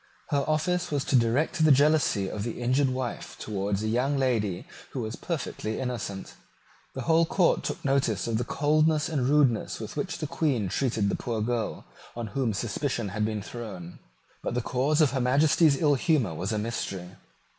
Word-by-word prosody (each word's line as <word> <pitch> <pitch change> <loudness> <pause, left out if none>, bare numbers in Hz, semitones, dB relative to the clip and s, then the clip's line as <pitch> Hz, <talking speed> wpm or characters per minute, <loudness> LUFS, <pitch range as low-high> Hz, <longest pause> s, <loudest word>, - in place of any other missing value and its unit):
Her 140 -3 +1
office 175 +4 0
was 145 -2 -1
to - - +1
direct 130 +8 +2
the 155 - +6
jealousy 140 -8 +3
of 105 - -4
the 115 +3 -4
injured 130 +3 +2
wife 130 -1 -4
towards 100 -1 -2
a - - -1
young 125 +6 +1
lady 110 -9 0 0.3
who 130 - -2
was 110 0 -4
perfectly 130 -9 -4
innocent. 115 -6 -4 0.6
The 130 - -4
whole 165 +4 +4
court 175 +2 +2
took - - -4
notice 135 -6 +1
of 115 -1 0
the - - 0
coldness 155 +3 +2
and 135 -5 0
rudeness 140 -6 +2
with 110 - -7
which 180 -4 -3
the 155 - -3
Queen 135 - 0
treated 110 -3 0
the - - 0
poor 115 -2 -3
girl 115 -1 -2 0.3
on 120 0 -4
whom 130 -4 +1
suspicion 115 +2 -2
had 105 +3 -1
been 105 -2 -3
thrown: 100 -7 -8 0.4
but - - -3
the 125 - +1
cause 140 +6 +1
of 150 -5 +4
Her 130 -1 -1
Majesty's 140 +3 +4
ill 150 -2 +4
humour 140 - +1
was 90 +6 -3
a 110 - 0
mystery. 100 -5 -4
125 Hz, 185 wpm, -27 LUFS, 110-145 Hz, 0.6 s, the